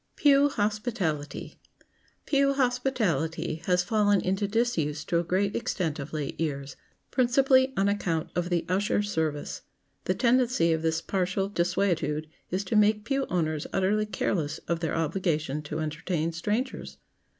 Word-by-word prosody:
[Sidenote: - - -17
PEW 285 0 +6
HOSPITALITY] 205 - -2 0.7
Pew 275 -1 +3
hospitality 225 - 0
has 180 -1 +3
fallen 205 0 +3
into 195 +3 0
disuse 185 -10 0
to 170 - +1
a - - 0
great 190 +4 0
extent 180 -10 -2
of 140 +1 -6
late 150 0 -4
years, 140 -3 -3 0.4
principally 260 +1 +4
on 195 +1 +3
account 175 -6 -1
of 175 0 -1
the 175 -2 0
usher 200 +3 +1
service. 160 -7 -2 0.4
The - - +1
tendency 240 -9 +3
of 160 - -1
this 160 0 0
partial 190 +1 -1
desuetude 170 -5 0 0.2
is 185 +2 -1
to 200 +3 -2
make 210 0 +4
pew 275 +1 0
owners 155 -4 -1
utterly 210 +3 +1
careless 175 -6 -1
of 170 -1 0
their 165 -2 -2
obligation 155 -3 -1
to 150 0 -5
entertain 155 +1 -2
strangers. 210 +10 -3
185 Hz, 145 wpm, -27 LUFS, 160-215 Hz, 0.7 s, PEW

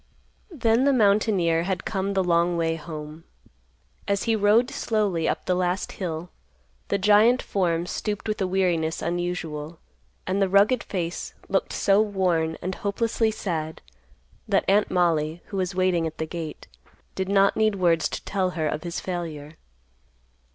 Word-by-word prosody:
Then 245 - +2
the 280 - +4
mountaineer 200 -7 +3
had 185 0 -3
come 195 -1 -2
the 190 - +2
long 170 0 +2
way 165 -1 0
home. 155 0 -8 0.8
As 200 0 0
he 225 -1 +1
rode 220 +4 +3
slowly 200 -7 0
up - - -3
the 185 - +1
last 180 +1 -1
hill, 175 -2 -5 0.6
the 200 - +1
giant 210 +5 +5
form 170 -3 0
stooped 210 +3 -4
with 215 -1 -2
a 190 - +1
weariness 175 -4 0
unusual, 170 -2 -3 0.5
and 190 +2 0
the 195 - +2
rugged 200 +6 +4
face 175 -3 -4
looked - - 0
so 200 +1 +3
worn 180 -6 0
and 185 - -2
hopelessly 220 +3 0
sad, 160 -7 -4 0.7
that - - +2
Aunt 205 +2 +3
Mollie, 165 -2 +1
who 200 - -4
was 185 -1 -2
waiting 185 -3 +2
at 160 - -8
the 160 - -2
gate, 160 -1 -7 0.5
did 190 0 -3
not 195 0 +4
need 215 -1 +2
words 170 -4 +2
to - - -6
tell 190 -2 0
her 155 -1 0
of 150 +1 -2
his 170 -1 -4
failure. 160 -5 -5
185 Hz, 160 wpm, -25 LUFS, 165-200 Hz, 0.8 s, giant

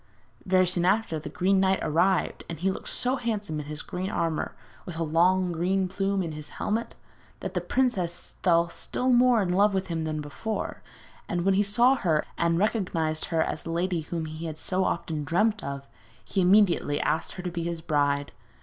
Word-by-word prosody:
Very 185 0 +4
soon 180 -1 +1
after 190 -3 +1
the 150 - -7
Green 190 +5 +2
Knight 190 0 +3
arrived, 180 +5 +1
and 165 -3 -5
he 190 +3 +1
looked - - -6
so 255 +2 +1
handsome 210 -10 -2
in 145 - -6
his 150 +1 -4
green 185 +2 -4
armour, 165 -4 -2 0.3
with 170 -3 -7
a 165 - 0
long 175 +3 +3
green 185 +3 0
plume 195 +1 -1
in 165 - -4
his 150 -1 -8
helmet, 225 +3 -2 0.5
that - - -4
the - - -1
princess 190 -10 -1
fell 170 -1 +4
still 255 +8 -2
more 245 -3 +5
in 180 -1 -1
love 200 +2 +4
with 190 -1 -2
him 165 -1 -2
than 155 -1 -2
before, 155 +9 -4 0.5
and 175 0 -1
when 195 - +4
he 195 - +3
saw 235 +6 +4
her, 160 -8 +1
and 170 0 +1
recognised 170 -6 0
her 165 -2 +1
as - - -3
the - - -8
lady 170 0 0
whom 160 +1 -4
he 155 +1 -6
had 155 -1 -6
so 185 +3 0
often 160 -4 -2
dreamt 205 +7 +1
of, 140 0 -5 0.4
he 195 - 0
immediately 180 -6 +4
asked 160 +2 -1
her 180 - -7
to 180 - -3
be 170 0 -3
his 170 0 -3
bride. 145 -3 0
180 Hz, 200 wpm, -27 LUFS, 160-195 Hz, 0.5 s, more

